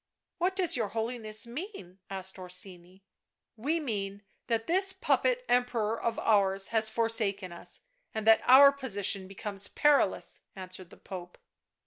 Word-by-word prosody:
" - - -60
What 365 +2 0
does 370 -3 +2
your 225 -4 -1
Holiness 220 0 +1
mean?" 235 - -8
asked 190 -1 -6
Orsini. 180 0 -7 0.3
" - - -60
We 325 +3 +1
mean 205 -7 -4 0.2
that 225 -1 0
this 380 +2 +3
puppet - - +1
Emperor 235 -3 0
of 230 -1 -1
ours 195 -2 +2
has 220 -1 +2
forsaken 220 -5 0
us, 170 - -6 0.3
and 220 -1 -4
that 225 0 +6
our 275 +2 +8
position 205 -8 -2
becomes 195 +1 -2
perilous," 295 -1 +1
answered 185 -1 -9
the - - -15
Pope. 180 -2 -9
220 Hz, 145 wpm, -29 LUFS, 195-255 Hz, 0.3 s, our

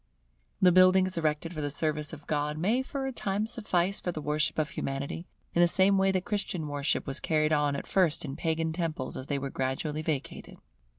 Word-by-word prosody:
The 180 - +6
buildings 185 +1 +5
erected 160 +1 -1
for 155 - -4
the 145 - -1
service 150 0 -2
of 155 -2 -10
God 150 0 -1
may 215 +10 +1
for 270 +1 -4
a 265 - -2
time 205 -3 -1
suffice 200 -5 0
for 180 - -2
the 160 - -5
worship 150 +1 0
of 155 -1 0
Humanity, 140 +5 -4 0.3
in 170 - +3
the 175 - +7
same 190 +3 +4
way 195 0 +3
that 185 -1 -1
Christian 190 -6 -2
worship 145 0 -1
was 135 -1 -2
carried 155 -1 +1
on 145 -1 +2
at - - -5
first 165 -5 +2
in 135 -1 -5
Pagan 160 0 -1
temples 160 -6 -3
as 130 - -6
they 140 - -1
were 135 0 -4
gradually 135 +4 -2
vacated. 155 -4 -4
160 Hz, 210 wpm, -29 LUFS, 150-185 Hz, 0.3 s, the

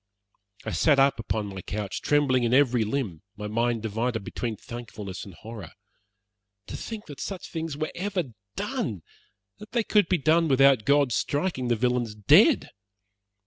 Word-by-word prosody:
I - - -3
sat 150 -3 +3
up 135 -3 +3
on 110 -1 -1
my 95 -2 -7
couch, 100 +1 -4
trembling 145 -4 +2
in 120 +1 +2
every 125 -4 +4
limb, 110 - -3 0.2
my 105 - -6
mind 115 +1 0
divided 110 +1 -2
between 115 +2 -4
thankfulness 110 -5 -8
and 95 -4 -11
horror. 110 -6 -9 0.9
To - - -7
think 220 -2 -6
that 145 -3 -10
such 195 -3 -6
things 160 -3 -4
were 155 +1 -2
ever 180 - -3 0.2
done 200 - -3 0.6
that 210 +2 -12
they 235 -2 +2
could 210 -4 +3
be 185 - +3
done 160 +3 +3
without 135 -5 +5
God 140 -1 +3
striking 145 0 -1
the 120 - +2
villains 120 -1 0
dead. 105 -2 +5
125 Hz, 160 wpm, -26 LUFS, 110-155 Hz, 0.9 s, without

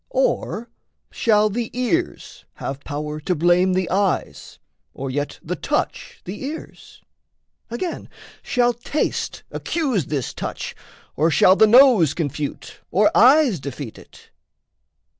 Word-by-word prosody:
Or - - -1 0.4
shall 215 -2 +2
the 230 +2 -3
ears 335 +8 -2
have 135 +1 -6
power 150 +1 -5
to 175 +4 -1
blame 175 +3 +3
the 185 -1 0
eyes, 195 -1 -1 0.4
Or 135 0 -4
yet 145 +2 -3
the - - -3
touch - - -3
the 195 +8 -7
ears? 300 +4 -9 0.7
Again, 245 +10 -5 0.3
shall 245 -1 +1
taste 240 +6 -3
Accuse 260 - -1
this 140 -5 -3
touch - - -5 0.4
or 160 +3 +2
shall 185 +3 +5
the 220 - +6
nose 230 - +6
confute 150 -2 -4
Or 210 +2 +2
eyes 255 - +5
defeat 135 -3 -7
it? - - -18
195 Hz, 120 wpm, -21 LUFS, 150-245 Hz, 0.7 s, the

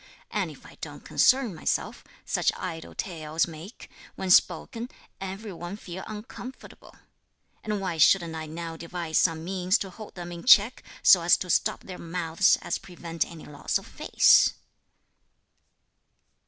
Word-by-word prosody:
and - - -1
if - - -14
I - - -15
don't - - -8
concern 255 -5 +3
myself, 160 - -2 0.2
such - - +1
idle 165 -3 -6
tales 160 -3 -2
make, 170 +7 -11 0.3
when 190 -1 -2
spoken, 230 +8 +3 0.3
every 195 +2 -6
one 175 +3 -7
feel 185 -2 -8
uncomfortable; 220 +4 -10 0.7
and 210 -1 -2
why 180 -4 -3
shouldn't 170 +1 +5
I 160 -1 -5
now 165 +1 -6
devise 170 -1 -2
some 165 -2 +1
means 185 +1 +1
to 195 - -6
hold 215 +3 -11
them 175 -1 -7
in 170 -1 -8
check, 235 0 +6 0.2
so 180 - +8
as 170 +1 +5
to 180 - -3
stop - - +1
their 185 -2 -9
mouths, 170 +1 +2
and - - -2
prevent 170 -2 -4
any 165 -2 -11
loss 145 -1 -2
of - - -11
face!" - - +4
175 Hz, 150 wpm, -27 LUFS, 165-195 Hz, 0.7 s, so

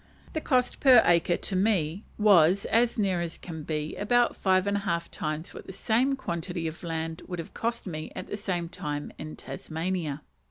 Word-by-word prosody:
The 315 - -1
cost 250 -4 +1
per 255 -4 +8
acre 175 0 +3
to 195 - -2
me 185 -2 +1
was, 195 -3 +5
as 235 +1 +2
near 190 -5 +1
as 170 -1 -4
can 160 -3 -7
be, 150 0 -3
about 240 +3 +2
five 185 -1 +2
and 200 0 +1
a - - 0
half 170 -4 -2
times 155 +2 -4
what - - -10
the - - -6
same 240 +7 +2
quantity 170 -7 -3
of 160 +1 -6
land 165 0 -3
would 180 - -4
have 165 - -7
cost 235 +1 -2
me 155 -4 -5
at - - -5
the - - -5
same 185 -5 -2
time 145 -3 -5
in 155 0 -6
Tasmania. 160 -3 -4
180 Hz, 195 wpm, -28 LUFS, 160-210 Hz, -, per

